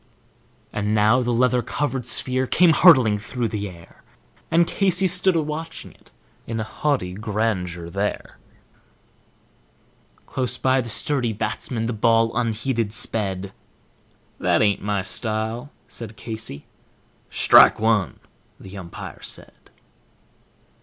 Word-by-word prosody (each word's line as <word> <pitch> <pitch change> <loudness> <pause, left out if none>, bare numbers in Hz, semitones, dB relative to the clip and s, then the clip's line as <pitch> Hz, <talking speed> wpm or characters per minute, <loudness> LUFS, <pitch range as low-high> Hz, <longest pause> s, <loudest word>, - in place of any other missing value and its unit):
And 105 +1 -1
now 110 +4 +4
the 120 0 -1
leather 125 +1 +2
covered 130 0 -3
sphere 130 +2 +1
came 175 +3 +4
hurtling 130 - +6
through 115 +2 -3
the 105 -2 -4
air, 85 -2 -16 0.5
And 170 +1 +4
Casey 190 0 +1
stood 180 0 +2
a 160 - +1
watching 155 +2 -6
it - - -24 0.4
in 115 - -3
haughty 110 -2 -2
grandeur 100 -5 -2
there, 100 +4 -4 1.9
Close 125 -1 -2
by 130 0 +2
the 120 - -7
sturdy 120 +1 0
batsman 115 +2 -3
the 120 - -2
ball 115 +1 +2
unheeded 115 -1 -1
sped 100 -3 0 0.9
"That - - +2
ain't 100 -2 +1
my 100 -2 -1
style," 110 +5 -3 0.2
said 110 -2 -10
Casey. 110 - -5 0.6
"Strike - - +6
one," 105 -8 +1 0.4
the 95 +1 -11
umpire 85 -2 -9
said. - - -9
115 Hz, 120 wpm, -22 LUFS, 105-130 Hz, 1.9 s, hurtling